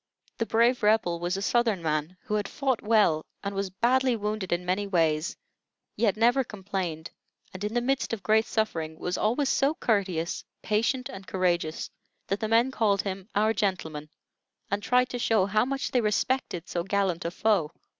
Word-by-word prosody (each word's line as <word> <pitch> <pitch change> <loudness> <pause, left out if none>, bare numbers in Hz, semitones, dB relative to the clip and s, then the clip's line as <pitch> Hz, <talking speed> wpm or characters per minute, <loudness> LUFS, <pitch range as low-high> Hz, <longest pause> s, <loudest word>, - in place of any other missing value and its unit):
The 230 - 0
"brave 235 +2 +3
Rebel" 210 -5 +2
was 175 +2 -1
a 195 - -3
Southern 225 -6 +1
man 155 +3 -1
who - - -4
had 210 -1 0
fought 265 -4 -1
well 210 -8 +3 0.2
and 200 0 -3
was 195 0 -2
badly 250 +6 +2
wounded 210 -2 -3
in 175 +1 0
many 190 +3 0
ways, 165 +1 +1 0.6
yet 215 -2 +1
never 240 +4 +4
complained; 190 -7 -5 0.4
and 185 +1 -7
in 210 +3 -3
the 240 - +2
midst 270 +2 0
of 220 -5 -4
great 220 +1 +3
suffering 165 -8 -2
was 180 +2 -2
always 255 +6 +1
so 280 +4 +2
courteous, 190 - 0 0.2
patient, 230 +4 0
and 190 0 -10
courageous, 175 -4 -1 0.3
that 195 - -2
the 220 - -1
men 230 +4 +3
called 210 -5 +1
him 195 +1 -5
"our 215 +2 +3
gentleman," 170 -8 -2 0.6
and 200 +1 0
tried 250 +3 +2
to 245 - -4
show 220 -5 +3
how 215 +3 +2
much 270 +1 -2
they 250 - +3
respected 210 -4 -1
so 175 - -2
gallant 195 -3 0
a 170 - -1
foe. 185 -3 +1
205 Hz, 180 wpm, -27 LUFS, 180-230 Hz, 0.6 s, never